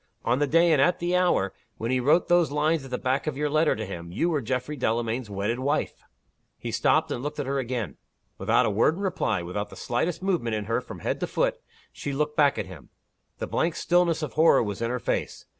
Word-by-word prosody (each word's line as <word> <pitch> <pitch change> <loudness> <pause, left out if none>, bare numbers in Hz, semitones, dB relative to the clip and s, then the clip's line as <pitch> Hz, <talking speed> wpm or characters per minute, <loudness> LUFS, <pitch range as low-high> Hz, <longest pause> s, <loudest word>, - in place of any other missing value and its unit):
On 120 +3 +2
the 145 - +2
day, 165 +3 +4
and 150 -4 +4
at 180 +4 +3
the 175 +1 0
hour, 175 - +2 0.2
when 115 +2 -2
he 130 - +2
wrote 150 +7 +3
those 175 -2 +4
lines 150 +1 +1
at 135 - -9
the 125 - -2
back 130 +4 -1
of 145 -3 -2
your 150 0 -1
letter 155 +1 +3
to 110 +1 -4
him, 85 -3 -7
you 170 - 0
were 150 -3 0
Geoffrey 130 +5 -2
Delamayn's 115 -2 -1
wedded 105 +5 -2
wife!" 140 +3 -1 0.6
He - - -5
stopped, - - +2
and 120 - -2
looked 150 +2 -5
at 145 - -1
her 135 +1 -1
again. 120 - -3 0.4
Without - - +3
a - - +1
word 115 +10 +3
in 195 - -6
reply, 115 - 0
without 100 +4 -4
the - - -11
slightest 160 +10 -2
movement 165 - 0
in 105 -1 -3
her 115 +3 0
from - - -10
head - - -2
to - - -2
foot, - - 0 0.3
she 140 - -4
looked 150 +2 -1
back 145 -2 +4
at - - -2
him. 90 -7 -12 0.5
The - - -3
blank 165 0 0
stillness 170 -2 +2
of 150 - -4
horror 160 -4 +5
was 105 0 -4
in 115 - 0
her 125 - -1
face. - - -3
135 Hz, 240 wpm, -26 LUFS, 115-160 Hz, 0.6 s, horror